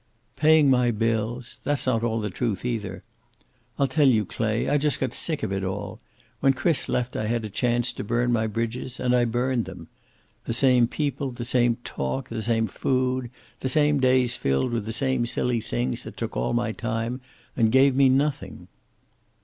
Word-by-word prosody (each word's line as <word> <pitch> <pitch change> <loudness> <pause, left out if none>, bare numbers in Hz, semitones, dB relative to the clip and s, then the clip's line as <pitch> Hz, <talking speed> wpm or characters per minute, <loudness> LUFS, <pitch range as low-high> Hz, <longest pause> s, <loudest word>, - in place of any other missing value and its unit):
"Paying 155 +1 +5
my 125 -1 +3
bills! 115 +2 -2
That's 145 -1 0
not 120 -4 +1
all 115 -1 0
the 105 -2 -3
truth, 110 0 -2
either. 105 -6 -3 0.7
I'll 140 - +3
tell 140 +2 +3
you, 110 -5 +3
Clay. 110 +3 -1
I 145 +1 +2
just 150 0 0
got 130 -2 -2
sick 155 -3 -1
of 95 - -1
it 95 0 -2
all. 100 +3 -4 0.4
When 135 +3 +4
Chris 160 +2 0
left 125 0 -1
I 110 - -2
had 115 0 -1
a 105 - -7
chance 120 +2 +1
to - - -5
burn 120 +3 0
my 110 -1 +1
bridges 115 +3 -4
and 125 -1 +2
I 120 -1 +3
burned 120 +1 0
them. - - -10 0.6
The - - -2
same 125 -1 +4
people, 140 0 -2
the 120 -1 -6
same 120 -1 +2
talk, 120 - -4
the 115 -1 -4
same 115 0 +1
food, 130 +3 -1 0.3
the 130 - -2
same 145 +1 +3
days 130 -2 +3
filled 70 - 0
with 115 -3 -2
the - - -2
same 130 0 0
silly 120 0 0
things - - -2
that - - -10
took - - -4
all 60 - -1
my 120 -1 0
time 115 +3 -3 0.3
and 110 -2 +2
gave 135 +1 +5
me 135 -1 +5
nothing." 140 +1 -1
120 Hz, 190 wpm, -25 LUFS, 115-130 Hz, 0.7 s, Paying